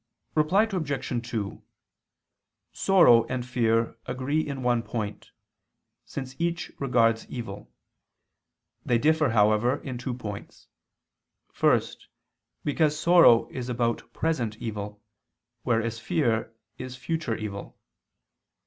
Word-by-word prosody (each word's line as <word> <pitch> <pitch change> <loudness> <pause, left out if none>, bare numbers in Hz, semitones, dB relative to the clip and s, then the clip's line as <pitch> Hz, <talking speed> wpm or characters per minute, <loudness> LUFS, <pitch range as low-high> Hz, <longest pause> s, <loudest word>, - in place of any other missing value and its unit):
Reply 160 +7 +3
Obj. 140 - -3
2: 105 -4 -4 1.1
Sorrow 170 -12 +6
and 125 -1 -3
fear 115 -2 0
agree 130 +4 -1
in 140 -4 -5
one 120 -1 +2
point, 105 -2 -5 0.8
since 130 -1 -7
each 170 0 -1
regards 115 -4 +2
evil: 105 -5 -7 1.1
they 120 - +2
differ, 155 +2 +3
however, 110 +2 +3
in 125 -2 -5
two 125 -1 -3
points. 105 -5 -8 0.8
First, - - +1 0.6
because 150 +1 +1
sorrow 165 -9 +6
is 125 -1 -5
about 120 -1 -1
present 125 -10 -1
evil, 105 -2 -6 0.6
whereas 115 -1 0
fear 115 -7 0 0.3
is 130 0 -6
future 125 -1 -2
evil. 105 -2 -7
125 Hz, 105 wpm, -26 LUFS, 115-145 Hz, 1.1 s, Sorrow